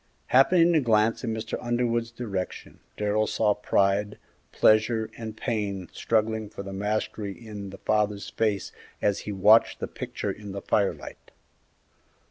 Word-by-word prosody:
Happening 170 Hz, +6 st, +6 dB
to 160 Hz, -, +5 dB
glance 115 Hz, -3 st, +2 dB
in 115 Hz, -, -1 dB
Mr. 110 Hz, 0 st, -4 dB
Underwood's 120 Hz, -1 st, 0 dB
direction 105 Hz, -6 st, -5 dB, 0.2 s
Darrell 105 Hz, +1 st, +1 dB
saw 105 Hz, -2 st, +2 dB
pride, 100 Hz, 0 st, +1 dB, 0.3 s
pleasure, 110 Hz, 0 st, +3 dB
and 110 Hz, -1 st, -7 dB
pain 100 Hz, -7 st, -3 dB
struggling 110 Hz, -1 st, 0 dB
for 100 Hz, -, -8 dB
the 100 Hz, 0 st, -7 dB
mastery 105 Hz, 0 st, -2 dB
in 105 Hz, -4 st, -8 dB
the 100 Hz, -, -10 dB
father's 105 Hz, -1 st, 0 dB
face 105 Hz, -4 st, -1 dB, 0.3 s
as 100 Hz, -, +1 dB
he -, -, -1 dB
watched 105 Hz, +3 st, +5 dB
the -, -, -3 dB
picture -, -, -4 dB
in 105 Hz, -2 st, -8 dB
the 100 Hz, -, -5 dB
firelight. 100 Hz, -2 st, -1 dB
110 Hz, 140 wpm, -26 LUFS, 100-115 Hz, 0.3 s, Happening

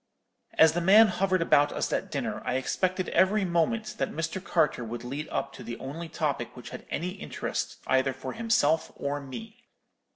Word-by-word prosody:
"As 160 Hz, -1 st, +6 dB
the 175 Hz, -, 0 dB
man 210 Hz, +5 st, +7 dB
hovered 185 Hz, -1 st, +1 dB
about 145 Hz, -2 st, +4 dB
us -, -, -2 dB
at -, -, -1 dB
dinner, -, -, -3 dB
I 125 Hz, -, -1 dB
expected 185 Hz, +7 st, 0 dB
every 195 Hz, +2 st, +3 dB
moment 210 Hz, +6 st, 0 dB
that -, -, 0 dB
Mr. 165 Hz, +4 st, -3 dB
Carter 155 Hz, -8 st, +1 dB
would 115 Hz, +1 st, -6 dB
lead 140 Hz, +5 st, -5 dB
up 140 Hz, -, -3 dB
to -, -, -10 dB
the 120 Hz, -, -6 dB
only 160 Hz, +5 st, -6 dB
topic 145 Hz, -7 st, -2 dB
which 125 Hz, -, -9 dB
had 125 Hz, -, -9 dB
any 175 Hz, +4 st, -2 dB
interest 195 Hz, +2 st, -4 dB
either 130 Hz, +1 st, +2 dB
for 135 Hz, +1 st, -6 dB
himself 225 Hz, -9 st, +2 dB
or 140 Hz, +1 st, -2 dB
me. 225 Hz, -, -10 dB
165 Hz, 185 wpm, -28 LUFS, 140-190 Hz, -, man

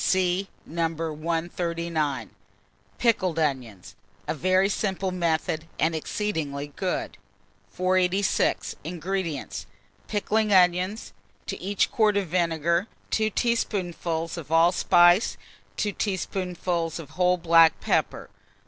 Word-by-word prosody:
(See 185 Hz, +1 st, +1 dB, 0.2 s
No. 165 Hz, 0 st, 0 dB
139.) 165 Hz, -3 st, -2 dB, 0.7 s
PICKLED 190 Hz, -8 st, +1 dB
ONIONS 130 Hz, -, -2 dB, 0.3 s
(a -, -, 0 dB
very 185 Hz, +5 st, +2 dB
Simple 195 Hz, -2 st, -1 dB
Method, 160 Hz, -2 st, -1 dB
and 160 Hz, +1 st, +1 dB
exceedingly 155 Hz, -5 st, -3 dB
Good). 185 Hz, -2 st, -3 dB, 0.5 s
486. 185 Hz, +1 st, +1 dB
INGREDIENTS. 165 Hz, -, -4 dB, 0.4 s
Pickling 215 Hz, 0 st, 0 dB
onions; 185 Hz, +3 st, +2 dB, 0.3 s
to -, -, -5 dB
each 200 Hz, +1 st, 0 dB
quart 215 Hz, -2 st, +3 dB
of 195 Hz, -4 st, -1 dB
vinegar, 170 Hz, +1 st, +1 dB, 0.2 s
2 215 Hz, 0 st, +2 dB
teaspoonfuls 175 Hz, -8 st, -1 dB
of 160 Hz, -2 st, -8 dB
allspice, 175 Hz, +3 st, +4 dB, 0.4 s
2 210 Hz, -, 0 dB
teaspoonfuls 180 Hz, -4 st, -2 dB
of 155 Hz, -4 st, -9 dB
whole 180 Hz, +2 st, +2 dB
black 165 Hz, -2 st, +5 dB
pepper. -, -, -1 dB
175 Hz, 100 wpm, -26 LUFS, 160-190 Hz, 0.7 s, black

